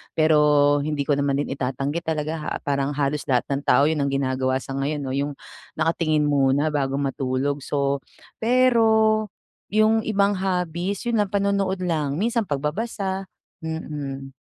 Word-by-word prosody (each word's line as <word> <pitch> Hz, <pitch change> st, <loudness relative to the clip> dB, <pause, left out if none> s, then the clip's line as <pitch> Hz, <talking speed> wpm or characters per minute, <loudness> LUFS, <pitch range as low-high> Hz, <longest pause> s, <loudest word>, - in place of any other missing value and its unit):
pero 150 Hz, -2 st, +4 dB
hindi 145 Hz, 0 st, -1 dB
ko 140 Hz, -, -2 dB
naman 140 Hz, 0 st, +1 dB
din -, -, -6 dB
itatanggi 135 Hz, +3 st, -2 dB
talaga 160 Hz, -1 st, -3 dB, 0.2 s
ah -, -, -4 dB
parang 140 Hz, 0 st, -1 dB
halos 145 Hz, 0 st, -1 dB
lahat 125 Hz, -2 st, +2 dB
ng 140 Hz, 0 st, 0 dB
tao -, -, +5 dB
yun 155 Hz, +1 st, +2 dB
ang 140 Hz, -, +1 dB
ginagawa 130 Hz, -1 st, 0 dB
sa -, -, -8 dB
ngayon 145 Hz, +2 st, -1 dB
no, 130 Hz, -, -4 dB
yung 140 Hz, +2 st, -2 dB, 0.4 s
nakatingin 155 Hz, -1 st, +1 dB
muna 145 Hz, +1 st, +2 dB
bago 135 Hz, -2 st, -1 dB
matulog. 135 Hz, 0 st, -1 dB
So, 140 Hz, 0 st, -1 dB, 0.4 s
pero 225 Hz, -3 st, +3 dB, 0.4 s
yung 215 Hz, +1 st, +3 dB
ibang 200 Hz, -2 st, +2 dB
hobbies 185 Hz, +1 st, -2 dB
yun 235 Hz, -, +1 dB
lang 205 Hz, -3 st, +1 dB
panonood 200 Hz, -1 st, 0 dB
lang 155 Hz, -5 st, -1 dB
minsan 230 Hz, +2 st, +1 dB
pagbabasa, 190 Hz, -, -3 dB, 0.4 s
mm. 145 Hz, -4 st, -5 dB
150 Hz, 150 wpm, -23 LUFS, 140-190 Hz, 0.4 s, tao